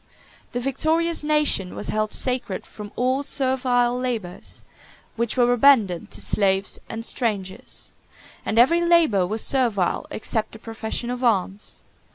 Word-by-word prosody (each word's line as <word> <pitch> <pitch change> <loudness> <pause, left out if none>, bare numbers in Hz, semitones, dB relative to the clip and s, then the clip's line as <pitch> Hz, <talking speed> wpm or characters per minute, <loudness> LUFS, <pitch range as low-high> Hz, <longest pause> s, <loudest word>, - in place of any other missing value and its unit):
The 245 - -1
victorious 315 +6 0
nation 300 -11 +1
was - - -3
held 215 0 0
sacred 250 -7 -1
from 210 -1 -10
all 255 +3 +1
servile 255 -3 +1
labors, 230 -8 -4 0.5
which 235 +1 -1
were 245 0 +4
abandoned 225 -9 +4
to - - -3
slaves 195 -1 +1
and 225 0 -5
strangers; 205 -8 -3 0.5
and 220 - -2
every 335 +9 +5
labor 325 - +4
was 215 +3 -1
servile 235 -9 +1
except 220 0 -2
the - - -9
profession 225 +2 -4
of 250 +1 -4
arms. 205 -3 0
240 Hz, 135 wpm, -23 LUFS, 210-260 Hz, 0.5 s, every